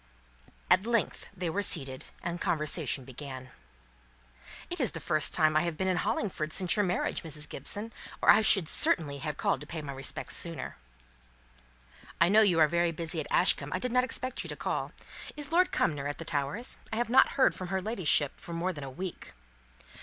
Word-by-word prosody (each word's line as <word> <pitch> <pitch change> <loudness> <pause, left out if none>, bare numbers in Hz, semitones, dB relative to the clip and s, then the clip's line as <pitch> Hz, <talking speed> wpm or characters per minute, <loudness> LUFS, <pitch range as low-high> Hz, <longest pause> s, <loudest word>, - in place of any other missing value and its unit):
At 185 +4 +3
length 235 -2 -1
they 185 -3 -5
were 205 - -1
seated, 135 -9 +2 0.2
and 175 0 -4
conversation 155 -3 0
began. 130 0 -9 1.2
"It - - -6
is - - 0
the - - -5
first 155 0 +2
time 155 -2 +3
I 155 - +4
have 170 -2 -3
been 190 - -1
in 185 -1 +1
Hollingford 160 -4 -2
since 185 -2 +1
your 205 - +2
marriage, 180 -1 -1
Mrs. 150 -2 -2
Gibson, 220 +3 -2 0.3
or - - +6
I - - +5
should 195 -5 +6
certainly 145 -3 +1
have 150 0 -4
called - - 0
to 150 - -9
pay 165 - -6
my 140 -1 -6
respects 135 0 -3
sooner." 170 -2 -4 1.4
"I 170 - +5
know 215 +3 +6
you 185 -6 +4
are 155 - +6
very 170 +2 +1
busy 165 0 -1
at 150 - -4
Ashcombe. 145 +1 +2
I - - 0
did 250 +6 -3
not 250 +1 +3
expect 255 0 -2
you - - -6
to - - -4
call. - - -3 0.5
Is 295 0 -6
Lord 360 +2 +3
Cumnor 145 -3 0
at 145 - -4
the 165 - -8
Towers? 145 - -2
I - - -2
have 235 0 -1
not 260 - +5
heard 265 - +4
from 185 - -6
her 190 +1 -1
ladyship 185 - +1
for 170 - -8
more 175 +3 -2
than 145 -3 -8
a 135 - -6
week!" 180 +7 -7
170 Hz, 200 wpm, -29 LUFS, 150-200 Hz, 1.4 s, or